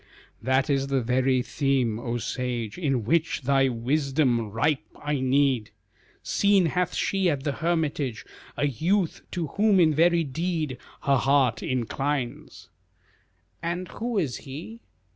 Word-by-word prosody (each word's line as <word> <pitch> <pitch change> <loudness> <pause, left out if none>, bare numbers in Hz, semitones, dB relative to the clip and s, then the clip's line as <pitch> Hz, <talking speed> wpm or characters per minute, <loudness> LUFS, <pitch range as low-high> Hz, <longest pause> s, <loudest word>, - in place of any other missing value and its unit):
"That 130 +1 +2
is 135 -2 +1
the 135 -1 +1
very 130 +1 +2
theme, 130 -7 0
O 120 0 -2
sage, 120 -2 -3
In 135 - -1
which 160 +3 +1
thy 135 0 +3
wisdom 130 -1 +1
ripe 135 +7 0 0.2
I 145 -1 -1
need; 130 -3 +2 0.5
Seen 200 -2 +3
hath 180 +2 0
she 195 -2 +1
at 140 -4 -1
the 145 - 0
hermitage 150 -6 -1 0.3
A 145 - +1
youth 165 - 0
to 175 -3 -2 0.2
whom 210 -3 +5
in 160 -3 +5
very 170 +2 +4
deed 155 -2 -2 0.2
Her 140 -1 +3
heart 135 -1 +2
inclines." 130 +1 -3 0.9
"And 175 +1 -3
who 235 0 -3
is 150 -10 0
he?" 165 - -9
140 Hz, 135 wpm, -26 LUFS, 130-165 Hz, 0.9 s, whom